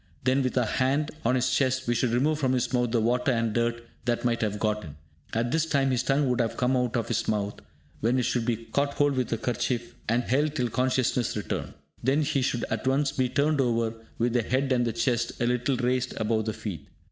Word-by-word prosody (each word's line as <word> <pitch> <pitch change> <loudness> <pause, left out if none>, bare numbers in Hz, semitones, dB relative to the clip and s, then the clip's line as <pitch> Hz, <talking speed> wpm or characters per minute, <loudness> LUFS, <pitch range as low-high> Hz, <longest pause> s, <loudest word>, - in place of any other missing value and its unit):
Then, 130 +2 +3
with 130 0 -1
our 125 - +3
hand 140 +3 +1
on 120 +3 +2
his 130 0 +1
chest, 130 -1 +1
we 120 - +3
should 120 +1 +1
remove 145 +6 +1
from 130 -3 +1
his 125 0 0
mouth 125 -1 +2
the 115 0 +1
water 125 +4 +2
and 115 -2 0
dirt 120 0 -1 0.2
that 120 0 0
might 115 -1 +1
have 105 -2 -1
got 105 0 -1
in. 75 -3 -9 0.4
At 120 +1 0
this 160 +1 +1
time 140 -4 +2
his 125 -2 +1
tongue 135 +2 +1
would 125 -1 +2 0.2
come 125 +1 +2
out 125 -1 0
of 115 - -1
his 115 -1 -1
mouth, 105 -1 -1 0.4
when 120 +4 +2
it 125 - +2
should 120 0 0
be 115 -1 0
caught 140 +6 -2
hold 145 0 +3
of 135 - -3
with 125 - -1
a - - 0
kerchief, 120 0 -2 0.2
and 120 +2 +2
held 145 +5 +1
till 125 -4 0
consciousness 125 -1 0
returns. 105 - -4 0.3
Then 135 +5 +2
he 140 -1 0
should 125 -2 0
at 110 +3 -2
once 140 +1 +2
be 130 -1 0
turned 145 +2 +2
over, 115 -3 +1 0.2
with 120 0 +1
the 120 - +3
head 130 +4 0
and 120 -1 +3
the 115 - -1
chest 120 -1 0
a 120 - +1
little 125 +2 +1
raised 125 +1 0
above 110 0 0
the 110 - -1
feet. 85 -12 -6
125 Hz, 240 wpm, -27 LUFS, 115-130 Hz, 0.4 s, Then